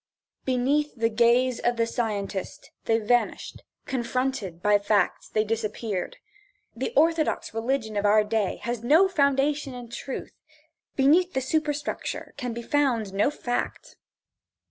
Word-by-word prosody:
Beneath 270 Hz, +4 st, +1 dB
the 230 Hz, -1 st, +1 dB
gaze 240 Hz, +2 st, +3 dB
of 240 Hz, 0 st, 0 dB
the 230 Hz, -, +2 dB
scientist 210 Hz, -5 st, -4 dB
they 225 Hz, -, +3 dB
vanished, 235 Hz, +2 st, 0 dB, 0.2 s
confronted 250 Hz, -7 st, -2 dB
by 205 Hz, +2 st, +3 dB
facts 205 Hz, -2 st, 0 dB
they 215 Hz, -, +1 dB
disappeared. 215 Hz, -3 st, -3 dB, 0.6 s
The 255 Hz, +3 st, -3 dB
orthodox 320 Hz, -2 st, +2 dB
religion 225 Hz, -1 st, -1 dB
of 205 Hz, -, 0 dB
our 210 Hz, +1 st, +5 dB
day 210 Hz, -2 st, 0 dB
has 235 Hz, -1 st, -3 dB
no 315 Hz, +10 st, +5 dB
foundation 280 Hz, -4 st, +1 dB
in 245 Hz, -1 st, -9 dB
truth. 260 Hz, +3 st, -6 dB, 0.6 s
Beneath 330 Hz, +7 st, +4 dB
the -, -, +1 dB
superstructure 295 Hz, +2 st, -2 dB
can 250 Hz, -4 st, -4 dB
be 235 Hz, +1 st, -6 dB
found 240 Hz, -8 st, +1 dB
no 200 Hz, +7 st, +2 dB
fact. 245 Hz, -4 st, -4 dB
240 Hz, 130 wpm, -26 LUFS, 220-275 Hz, 0.6 s, our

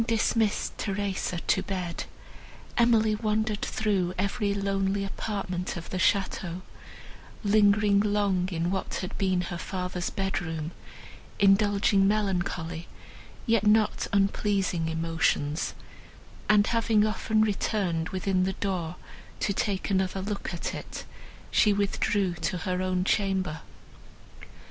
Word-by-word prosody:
Having 225 Hz, 0 st, +1 dB
dismissed 220 Hz, -1 st, +1 dB
Theresa 195 Hz, -3 st, -2 dB
to 190 Hz, -, +1 dB
bed, 180 Hz, -3 st, -4 dB, 0.7 s
Emily 225 Hz, -2 st, +4 dB
wandered 215 Hz, 0 st, 0 dB
through 195 Hz, -5 st, 0 dB
every 200 Hz, +2 st, 0 dB
lonely 195 Hz, 0 st, 0 dB
apartment 190 Hz, -3 st, -3 dB
of 170 Hz, -, -8 dB
the 185 Hz, -, -2 dB
château, 185 Hz, -2 st, 0 dB, 0.8 s
lingering 205 Hz, -1 st, +4 dB
long 200 Hz, -3 st, +1 dB
in 170 Hz, +1 st, -1 dB
what 190 Hz, -, -2 dB
had 185 Hz, -, -5 dB
been 185 Hz, -2 st, +2 dB
her 175 Hz, -1 st, -5 dB
father's 180 Hz, -2 st, -3 dB
bedroom, 165 Hz, -5 st, -3 dB, 0.7 s
indulging 200 Hz, 0 st, +4 dB
melancholy, 175 Hz, -5 st, -1 dB, 0.6 s
yet 230 Hz, -3 st, +3 dB
not 215 Hz, 0 st, +3 dB
unpleasing, 195 Hz, -3 st, +1 dB
emotions, 160 Hz, -2 st, 0 dB, 0.7 s
and, 210 Hz, -1 st, +6 dB
having 225 Hz, -2 st, +2 dB
often 215 Hz, 0 st, +1 dB
returned 190 Hz, -5 st, 0 dB
within 185 Hz, 0 st, 0 dB
the 190 Hz, +1 st, 0 dB
door 180 Hz, -4 st, -2 dB, 0.4 s
to 200 Hz, -, 0 dB
take 195 Hz, 0 st, -1 dB
another 190 Hz, 0 st, 0 dB
look 205 Hz, -1 st, -3 dB
at 175 Hz, -, -4 dB
it, -, -, -7 dB, 0.5 s
she 210 Hz, -, +4 dB
withdrew 200 Hz, -1 st, +1 dB
to 170 Hz, +3 st, -1 dB
her 180 Hz, +2 st, -2 dB
own 185 Hz, -1 st, 0 dB
chamber. 190 Hz, -5 st, 0 dB
195 Hz, 115 wpm, -27 LUFS, 180-205 Hz, 0.8 s, and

